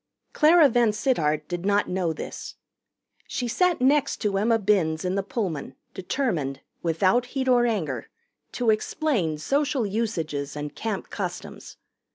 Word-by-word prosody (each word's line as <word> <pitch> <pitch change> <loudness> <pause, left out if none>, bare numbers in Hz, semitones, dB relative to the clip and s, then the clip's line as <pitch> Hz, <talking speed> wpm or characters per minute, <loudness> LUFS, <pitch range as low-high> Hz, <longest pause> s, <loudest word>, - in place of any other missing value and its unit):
Clara 315 0 +6
VanSittart 215 - +1
did 175 -1 -4
not 205 +1 +2
know 180 -2 -1
this. 160 - -7 0.7
She 245 - -3
sat 355 +8 +2
next 280 +2 +3
to 205 -2 0
Emma 225 +2 +3
Binns 185 -6 +1
in 180 - 0
the 200 - +1
Pullman, 180 - -4 0.2
determined, 180 - -2 0.2
without 185 +9 +2
heat 260 +1 -3
or 245 -1 +4
anger, 160 - -2 0.4
to 240 -3 +2
explain 215 - 0
Social 275 - 0
Usages 165 -10 -2
and 150 0 -5
Camp 215 -4 -4
Customs. - - -6
210 Hz, 135 wpm, -25 LUFS, 165-245 Hz, 0.7 s, Clara